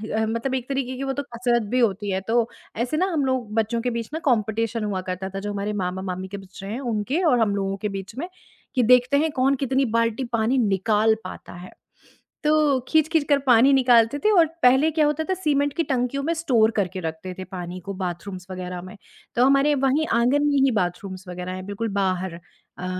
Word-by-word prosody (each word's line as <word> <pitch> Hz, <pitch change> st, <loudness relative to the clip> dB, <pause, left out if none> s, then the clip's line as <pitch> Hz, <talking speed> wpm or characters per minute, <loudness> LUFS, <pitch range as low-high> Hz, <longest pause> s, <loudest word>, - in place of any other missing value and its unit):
अ, 220 Hz, 0 st, +1 dB
मतलब 230 Hz, +4 st, -2 dB
एक 255 Hz, +1 st, -4 dB
तरीके 265 Hz, -2 st, -2 dB
की 275 Hz, -, -4 dB
वो 270 Hz, 0 st, -1 dB
तो 285 Hz, -, -3 dB
कसरत 240 Hz, -1 st, 0 dB
भी 255 Hz, -, +1 dB
होती 205 Hz, -3 st, +1 dB
है, 190 Hz, 0 st, -1 dB
तो 235 Hz, 0 st, +2 dB, 0.3 s
ऐसे 245 Hz, +6 st, -1 dB
ना 370 Hz, -, +2 dB
हम 290 Hz, -4 st, +1 dB
लोग 250 Hz, -5 st, -2 dB
बच्चों 225 Hz, +1 st, 0 dB
के 245 Hz, -, -1 dB
बीच 230 Hz, -, -6 dB
ना 320 Hz, -, -2 dB
कॉम्पिटिशन 225 Hz, 0 st, 0 dB
हुआ 195 Hz, -3 st, -2 dB
करता 190 Hz, +1 st, -4 dB
था, 195 Hz, +1 st, -5 dB
जो 205 Hz, +1 st, -4 dB
हमारे 205 Hz, +1 st, -3 dB
मामा-मामी 185 Hz, 0 st, -4 dB
के 200 Hz, +1 st, -7 dB
बच्चे 195 Hz, 0 st, -11 dB
हैं, 220 Hz, +6 st, -4 dB
उनके 245 Hz, -, -1 dB
और 250 Hz, -8 st, +4 dB
हम 205 Hz, -3 st, +2 dB
लोगों 195 Hz, 0 st, -2 dB
के 210 Hz, +1 st, -3 dB
बीच 195 Hz, +4 st, -10 dB
में, 340 Hz, +5 st, -3 dB, 0.5 s
कि 250 Hz, -, +3 dB
देखते 250 Hz, +3 st, +5 dB
हैं 315 Hz, +1 st, +1 dB
कौन 270 Hz, 0 st, +2 dB
कितनी 270 Hz, 0 st, 0 dB
बाल्टी 230 Hz, +2 st, 0 dB
पानी 230 Hz, +4 st, +2 dB
निकाल 215 Hz, 0 st, +2 dB
पाता 185 Hz, -, -9 dB
है। 175 Hz, +1 st, -10 dB, 0.7 s
तो 300 Hz, -3 st, +3 dB
खींच-खींच 315 Hz, -1 st, +3 dB
कर 285 Hz, -1 st, +4 dB
पानी 250 Hz, +3 st, +6 dB
निकालते 245 Hz, 0 st, +4 dB
थे, 430 Hz, -, +5 dB
और 345 Hz, -5 st, +6 dB, 0.2 s
पहले 265 Hz, +5 st, +5 dB
क्या 305 Hz, -1 st, +2 dB
होता 300 Hz, +2 st, 0 dB
था, -, -, +3 dB
सीमेंट 290 Hz, -5 st, 0 dB
की 335 Hz, -, +2 dB
टंकियों 255 Hz, +2 st, -1 dB
में 330 Hz, +3 st, 0 dB
स्टोर 245 Hz, -9 st, +2 dB
करके 190 Hz, -1 st, -1 dB
रखते 165 Hz, +3 st, -5 dB
थे -, -, -4 dB
पानी 180 Hz, -1 st, -7 dB
को 200 Hz, -, -3 dB
बाथरूम्स 180 Hz, +1 st, -5 dB
वगैरह 180 Hz, -1 st, -5 dB
में, 185 Hz, +3 st, -11 dB, 0.4 s
तो 245 Hz, +2 st, +4 dB
हमारे 275 Hz, +2 st, +4 dB
वहीं 295 Hz, +4 st, +2 dB
आँगन 250 Hz, +5 st, +3 dB
में 285 Hz, -1 st, +2 dB
ही 270 Hz, -, +4 dB
बाथरूम्स 185 Hz, +1 st, -5 dB
वगैरह 180 Hz, +1 st, -5 dB
हैं, 185 Hz, 0 st, -6 dB
बिल्कुल 205 Hz, +3 st, -3 dB
बाहर 185 Hz, -2 st, -1 dB, 0.4 s
अ, 180 Hz, -, -5 dB
230 Hz, 215 wpm, -23 LUFS, 195-270 Hz, 0.7 s, पानी